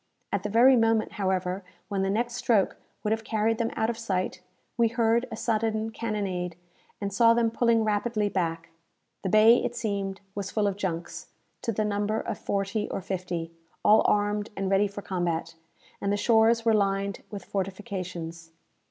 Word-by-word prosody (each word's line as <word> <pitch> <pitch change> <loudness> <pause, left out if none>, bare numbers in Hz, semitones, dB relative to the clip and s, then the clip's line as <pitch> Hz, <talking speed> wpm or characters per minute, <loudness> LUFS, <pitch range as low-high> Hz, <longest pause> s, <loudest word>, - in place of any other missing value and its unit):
At 200 - 0
the 210 - -3
very 245 +5 +6
moment, 225 -2 +2
however, 190 -1 -1 0.2
when 195 -1 -1
the 195 - +1
next 235 +4 0
stroke 225 -4 +1 0.3
would 210 - 0
have 220 0 0
carried 220 +1 0
them 230 -1 +1
out 220 - +1
of 230 0 -3
sight, 185 -4 -2 0.3
we 235 -1 +4
heard 230 +1 +2
a - - -3
sudden 220 -1 0
cannonade, 195 -6 -3 0.4
and 200 -1 -3
saw 230 +2 +5
them 230 -1 +2
pulling 230 -1 +3
rapidly 215 0 0
back. 165 -4 -2 0.5
The 190 - -2
bay, 220 +4 +6
it 240 - -2
seemed, 200 -4 -2
was 200 -1 -4
full 215 -2 0
of 200 -1 +1
junks, 175 -4 -4 0.3
to 230 - -1
the 215 0 0
number 210 +1 0
of 225 - -4
forty 200 +2 -1
or - - -3
fifty, 175 -3 -4 0.3
all 215 +1 +7
armed 205 0 +1
and 195 0 -1
ready 195 +1 +4
for 200 0 -8
combat; 170 -3 -2 0.5
and 200 - 0
the 205 - +1
shores 230 +1 +4
were 225 - +4
lined 200 -1 0
with 205 -3 -7
fortifications. 185 -4 -5
205 Hz, 175 wpm, -27 LUFS, 190-225 Hz, 0.5 s, all